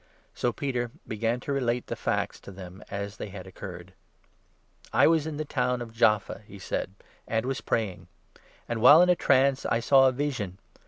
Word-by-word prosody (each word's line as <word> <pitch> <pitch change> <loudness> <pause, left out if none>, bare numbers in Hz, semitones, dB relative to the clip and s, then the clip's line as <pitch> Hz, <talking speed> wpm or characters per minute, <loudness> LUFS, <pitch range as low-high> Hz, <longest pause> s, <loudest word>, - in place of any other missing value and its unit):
So 120 - 0
Peter 125 -2 -2 0.2
began 115 +3 -1
to 140 - -3
relate 125 -3 0
the - - -4
facts - - -2
to - - -11
them 95 0 -10
as 100 +1 -5
they - - -6
had 95 -1 -9
oc 95 - -15
4 100 - -5
curred. 90 0 -10 0.6
" - - -40
I - - +5
was 160 -1 +3
in 155 -2 -4
the 155 - -3
town 125 -3 0
of 115 -2 -7
Jaffa," 105 -3 +2
he 100 - -11
said, 95 0 -4 0.2
" - - -29
and 115 +1 0
was 135 0 -2
praying; 105 -6 -2 0.3
5 - - -24 0.3
and, 115 -1 -3
while 150 +8 +9
in 180 - +2
a 180 - +5
trance, 135 -3 +3
I 115 - +1
saw 135 +2 +5
a - - +3
vision. 125 -9 -3
120 Hz, 215 wpm, -27 LUFS, 100-135 Hz, 0.6 s, while